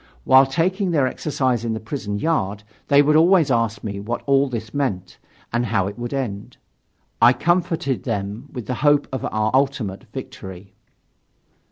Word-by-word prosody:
While 135 - +6
taking 180 +7 0
their 150 -6 +2
exercise 130 -3 -1
in 115 -1 -1
the 110 - -3
prison 110 -4 -4
yard, 105 -8 -1 0.2
they 140 0 +5
would 150 +1 +3
always 165 -2 +5
ask 115 -2 0
me 100 -2 -4
what 105 +4 -4
all 140 0 +3
this 115 -3 -6
meant 100 -11 -3 0.3
and 120 +1 0
how 100 -3 +1
it 100 +4 -6
would 120 0 -4
end. 115 -8 -4 0.6
I 120 - +7
comforted 170 -5 0
them 105 +3 -4
with 125 -4 -6
the 125 - -3
hope 145 0 +3
of 130 -3 -4
our 110 0 0
ultimate 130 -8 0
victory. 95 +1 -9
125 Hz, 165 wpm, -21 LUFS, 105-145 Hz, 0.6 s, I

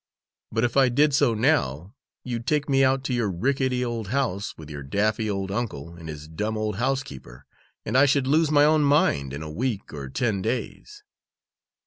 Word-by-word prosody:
But 115 +1 0
if 120 -1 0
I 135 -2 +5
did 145 +4 +3
so 135 -5 +3
now, 105 - 0 0.3
you'd 120 -2 -5
take 150 -2 +1
me 135 -1 +3
out 130 0 +2
to 130 - -2
your 120 -4 0
rickety 125 +6 0
old 115 -3 -4
house, 110 -5 -2
with 80 - -10
your 75 -2 -7
daffy 105 +9 0
old 95 -1 -3
uncle 95 - -4
and 85 -1 -10
his 75 0 -8
dumb 105 +7 -3
old 105 -2 -2
housekeeper, 75 - -4 0.4
and 110 - -3
I 140 +2 +6
should 135 -1 +2
lose 155 +3 +3
my 145 -1 +5
own 155 0 +4
mind 105 - +2
in 70 +3 -6
a 75 - -7
week 110 +2 -3
or 70 -3 -6
ten 100 - -1
days. 130 - -4
115 Hz, 190 wpm, -25 LUFS, 90-135 Hz, 0.4 s, I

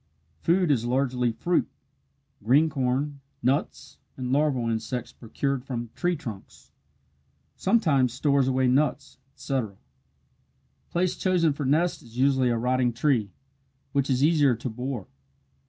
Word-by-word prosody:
Food 175 - +2
is 120 -5 +2
largely 125 -1 0
fruit 170 +10 0 0.7
green 145 +8 +4
corn, 140 +1 -1 0.2
nuts, 130 +3 -1 0.2
and 125 -1 -3
larval 135 -4 +1
insects 115 +2 -3
procured 130 +3 -3
from 120 -4 -5
tree 175 0 0
trunks. 115 -11 -10 0.8
Sometimes 155 - +2
stores 140 +1 +2
away 130 0 +2
nuts, 140 +4 0 0.2
etc. 130 -7 -3 1.1
Place 180 +1 0
chosen 175 -5 +2
for 145 0 -4
nest 170 +5 +1
is 115 0 -14
usually 130 -1 +3
a 120 - +1
rotting 125 +1 +1
tree, 120 -4 +1 0.6
which 140 0 0
is 130 0 +2
easier 145 -5 +4
to 120 +3 -5
bore. 125 -2 -4
130 Hz, 125 wpm, -26 LUFS, 125-150 Hz, 1.1 s, green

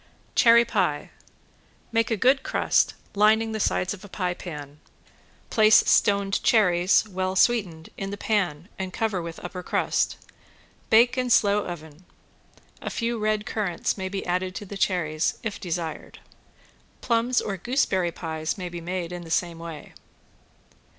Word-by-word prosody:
~CHERRY 235 -1 +6
PIE~ 180 -10 -1 0.8
Make 230 -1 +1
a 225 - 0
good 265 +6 +3
crust, - - +1 0.2
lining 220 +2 +3
the 220 - -3
sides 185 -2 0
of 195 -1 -11
a 205 - -11
pie 180 -2 -2
pan. 150 -5 -9 0.7
Place 215 -1 +5
stoned 200 -1 +3
cherries, 185 -2 +3
well 185 -1 -2
sweetened, 190 -7 +1
in 195 - -3
the 200 - -5
pan 180 -8 -1
and 190 -1 -4
cover 210 -3 -1
with 165 0 -7
upper 180 +1 -6
crust. - - 0 0.7
Bake 240 +3 +5
in 250 -1 -1
slow 210 -3 +3
oven. 160 -1 -9 0.8
(A - - -4
few 235 -1 -2
red 215 0 0
currants 200 -6 -2
may 190 -1 -4
be 195 0 -4
added 185 +1 -1
to 205 - -6
the 200 - -8
cherries 170 -5 0
if 225 -3 -4
desired.) 170 -3 -5 0.8
Plums 235 +1 +1
or 200 - -3
gooseberry 190 -4 0
pies 160 0 -4
may 180 -2 -5
be 175 0 -7
made 175 0 -4
in 175 0 -6
the 165 - -11
same 170 0 -1
way. 165 -3 -9
190 Hz, 150 wpm, -25 LUFS, 175-220 Hz, 0.8 s, ~CHERRY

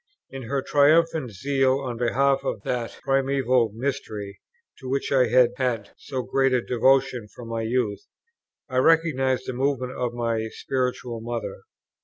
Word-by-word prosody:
In 135 -3 -7
her 140 -1 -1
triumphant 155 -1 +3
zeal 135 +4 +1
on 130 -3 -4
behalf 135 +3 +2
of 100 - -3
that 120 -2 -3
Primeval 135 -4 +2
Mystery, 110 -6 -4 0.4
to 130 - -7
which 135 +1 -1
I 130 -3 +4
had 120 +1 +5
had 120 -5 -1
so 130 -3 -5
great 135 +1 +1
a 125 - +3
devotion 125 -2 +2
from 115 +2 -11
my 115 0 -2
youth, 110 -3 -1 0.6
I 130 -3 -3
recognized 135 -3 +3
the 130 - -4
movement 130 -1 -1
of 125 -2 -2
my 115 -2 -1
Spiritual 125 -2 -3
Mother. 120 0 -5
130 Hz, 150 wpm, -24 LUFS, 120-135 Hz, 0.6 s, had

